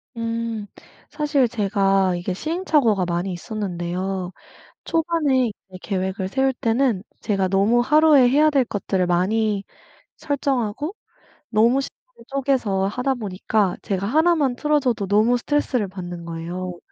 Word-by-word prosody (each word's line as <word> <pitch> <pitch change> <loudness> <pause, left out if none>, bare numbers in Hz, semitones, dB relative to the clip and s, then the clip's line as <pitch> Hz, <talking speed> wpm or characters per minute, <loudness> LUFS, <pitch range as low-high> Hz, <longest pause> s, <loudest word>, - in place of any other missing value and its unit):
음. 230 -2 -3 0.4
사실 295 -4 +1
제가 195 -4 +1
이게 180 +1 -3
시행착오가 300 - +1
많이 175 +2 -2
있었는데요 185 -1 -4 0.5
초반에 315 -6 +1
이제 190 -2 -13
계획을 190 -1 -2
세울 265 +5 +1
때는 230 -4 0 0.2
제가 195 -3 0
너무 200 +5 +3
하루에 300 -1 +5
해야 300 +4 +4
될 275 -4 +2
것들을 190 -3 -1
많이 200 +4 +1 0.5
설정하고 280 - -2 0.5
너무 235 +5 +3
시간을 - - -11
쪼개서 255 -8 0
하다 250 +6 -1
보니까 205 -2 -1
제가 195 0 -2
1 320 +8 +3
만 275 -6 +1
틀어져도 270 -9 +1
너무 215 +5 +3
스트레스를 250 -5 0
받는 175 -2 -7
거예요. 175 +2 -5
220 Hz, 290 characters per minute, -22 LUFS, 190-270 Hz, 0.5 s, 하루에